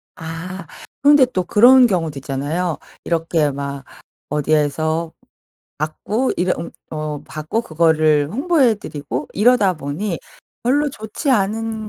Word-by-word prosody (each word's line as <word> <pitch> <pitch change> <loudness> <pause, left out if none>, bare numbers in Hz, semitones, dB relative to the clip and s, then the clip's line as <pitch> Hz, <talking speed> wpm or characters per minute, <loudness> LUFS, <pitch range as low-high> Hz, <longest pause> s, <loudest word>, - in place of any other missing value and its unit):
아 165 +4 -7 0.4
그런데 285 -1 +6
또 190 -7 -2
그런 245 +7 +6
경우도 165 -8 -1
있잖아요. 150 +6 -2 0.3
이렇게 165 -2 0
막 140 0 -5 0.5
어디에서 155 +2 0 0.7
받고 205 - -1
이래 180 +1 +1
웅 170 - -6 0.2
어 155 -1 -4
받고 155 +9 -3
그거를 155 -4 +2
홍보해 275 -2 +3
드리고 145 - -6
이러다 210 -3 +4
보니 165 +5 -4 0.5
별로 290 +4 +2
좋지 220 +3 -4
않은 220 0 0
170 Hz, 255 characters per minute, -19 LUFS, 155-220 Hz, 0.7 s, 그런데